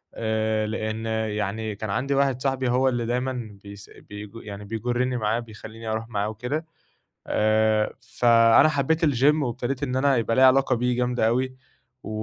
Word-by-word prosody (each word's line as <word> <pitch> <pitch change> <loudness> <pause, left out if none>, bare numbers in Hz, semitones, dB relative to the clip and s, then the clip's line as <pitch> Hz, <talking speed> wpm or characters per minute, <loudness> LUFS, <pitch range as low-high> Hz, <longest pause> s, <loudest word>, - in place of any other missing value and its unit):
آآ 110 -1 -1
لإن 110 0 -3 0.3
يعني 105 +1 -3
كان 110 0 -6
عندي 135 +7 -1
واحد 135 -2 +1
صاحبي 130 -2 0
هو 130 +2 +3
اللي 120 -2 -2
دايمًا 120 -3 -3
بيس 100 0 -11 0.2
بيج 105 0 -8
يعني 105 -2 -8
بيجرّني 120 +3 -1
معاه 110 +1 0
بيخلّيني 115 0 -10
أروح 110 +1 -3
معاه 105 -1 -1
وكده، 125 +9 -4 0.6
آآ 110 0 +2 0.3
فأنا 115 +4 +6
حبّيت 155 +3 +1
الGym 145 +2 +3
وإبتديت 125 +3 -3
إن 130 -2 -2
أنا 135 -1 +3
يبقى 115 0 0
ليّا 130 0 +6
علاقة 130 0 +4
بيه 125 +1 0
جامدة 125 -2 +1
أوي، 130 +2 0 0.5
و - - -7
115 Hz, 160 wpm, -24 LUFS, 110-130 Hz, 0.6 s, فأنا